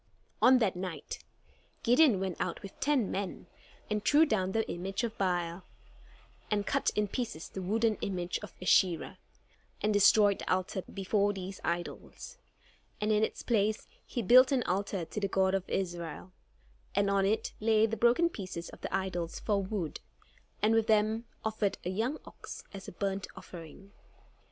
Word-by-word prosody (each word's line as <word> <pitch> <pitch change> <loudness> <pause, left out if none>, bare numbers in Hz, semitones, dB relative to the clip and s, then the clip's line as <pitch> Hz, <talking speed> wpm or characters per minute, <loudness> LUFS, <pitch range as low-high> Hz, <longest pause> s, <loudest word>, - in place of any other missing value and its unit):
On 255 0 +7
that 220 -7 +1
night, 180 -2 -5 0.6
Gideon 245 -3 +5
went 190 -2 -3
out - - -3
with 195 - -10
ten 270 -6 +1
men, 195 -1 -4 0.4
and 210 -1 -1
threw 295 +8 +6
down 190 -9 0
the 220 +2 0
image 195 +6 -3
of 230 -1 -2
Baal, 175 -2 -1 0.9
and 205 -1 0
cut - - +1
in 210 0 +1
pieces 225 -6 -4
the 190 - -6
wooden 220 +3 +1
image 180 -2 -2
of 210 - -9
Asherah, 180 -1 +2 0.6
and 210 0 +1
destroyed 205 0 +5
the - - -3
altar 185 +1 0
before 200 +1 +1
these 190 0 -7
idols. 175 - -5 0.6
And 210 +1 0
in 215 0 +3
its - - -2
place 215 -2 +1 0.2
he 240 - -4
built 255 +6 +7
an 260 -3 +2
altar 195 -2 -1
to 210 - -5
the 200 - 0
God 190 0 +2
of 190 -1 -1
Israel; 175 -2 -3 0.6
and 200 0 +3
on 200 0 +2
it 215 +2 0
laid 220 0 +3
the - - 0
broken 240 +9 +4
pieces 185 - -6
of - - -13
the - - -5
idols 180 -3 -2
for 205 -2 +1
wood, 190 -5 -3 0.6
and 215 +1 +4
with 225 -1 +3
them 220 +1 +2 0.2
offered 215 -2 0
a 180 - -1
young 230 +10 -1
ox - - -9
as 195 -1 -8
a - - -6
burnt 195 +1 -2
offering. 175 +3 -11
200 Hz, 165 wpm, -31 LUFS, 185-220 Hz, 0.9 s, On